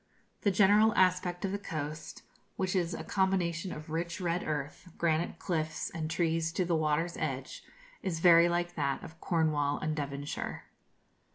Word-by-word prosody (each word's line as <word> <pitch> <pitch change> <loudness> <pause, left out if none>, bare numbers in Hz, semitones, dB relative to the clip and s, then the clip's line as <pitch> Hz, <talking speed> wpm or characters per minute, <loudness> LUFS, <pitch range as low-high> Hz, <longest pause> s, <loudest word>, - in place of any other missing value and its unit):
The 205 - +3
general 205 +3 +5
aspect 180 0 +2
of 190 - -2
the 200 - -2
coast, 155 -4 -6 0.3
which 190 0 -1
is 175 -2 0
a - - -6
combination 185 -2 0
of 155 +1 -8
rich 170 +3 -2
red 175 -1 0
earth, 150 +3 -4
granite 170 0 0
cliffs, 155 -3 -2
and 155 -1 -4
trees 165 0 0
to 185 - 0
the 170 -1 +1
water's 155 +2 0
edge, 135 -4 -4 0.4
is 175 -4 -2
very 170 0 +7
like 175 0 -1
that 140 0 -1
of 165 -2 -11
Cornwall 155 -4 +1
and 155 0 -2
Devonshire. 145 -1 -4
170 Hz, 160 wpm, -31 LUFS, 155-180 Hz, 0.4 s, very